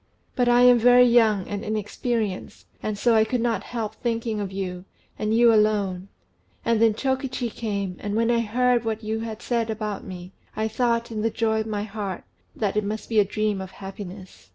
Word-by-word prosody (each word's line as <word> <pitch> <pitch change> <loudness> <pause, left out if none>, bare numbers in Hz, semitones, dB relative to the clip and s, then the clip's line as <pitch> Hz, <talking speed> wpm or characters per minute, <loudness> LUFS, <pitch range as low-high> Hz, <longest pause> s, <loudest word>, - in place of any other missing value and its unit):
But 245 -1 +2
I 240 0 +5
am 245 -1 +7
very 245 +1 +7
young 225 -5 +4
and 205 +1 -4
inexperienced, 215 -1 -3 0.2
and 215 -1 -3
so 235 +3 +3
I 220 -1 +5
could 240 +3 -1
not 230 -4 0
help 220 -2 -4
thinking 230 -1 -2
of 200 -2 -3
you, 185 -2 -5 0.3
and 215 0 -1
you 230 +1 +5
alone; 205 -4 +1 0.6
and 230 -1 +2
then 225 -2 +4
Chokichi 265 -1 -2
came, 200 -5 -3
and 205 0 -3
when 230 +1 +2
I 235 - +3
heard 240 +2 +2
what 225 0 -3
you 220 +1 -2
had 225 0 -6
said 230 -2 -1
about 215 -2 -3
me, 180 -1 -9 0.2
I 220 0 0
thought, 235 +1 0
in 215 -1 -3
the 225 - +1
joy 220 0 0
of 220 - -5
my 205 -1 -2
heart, 200 -3 -5 0.3
that 210 -2 -1
it 210 - +1
must 210 +1 -4
be 225 -2 +3
a - - +6
dream 210 0 -1
of 190 - -7
happiness." 195 -1 -10
220 Hz, 200 wpm, -24 LUFS, 205-235 Hz, 0.6 s, am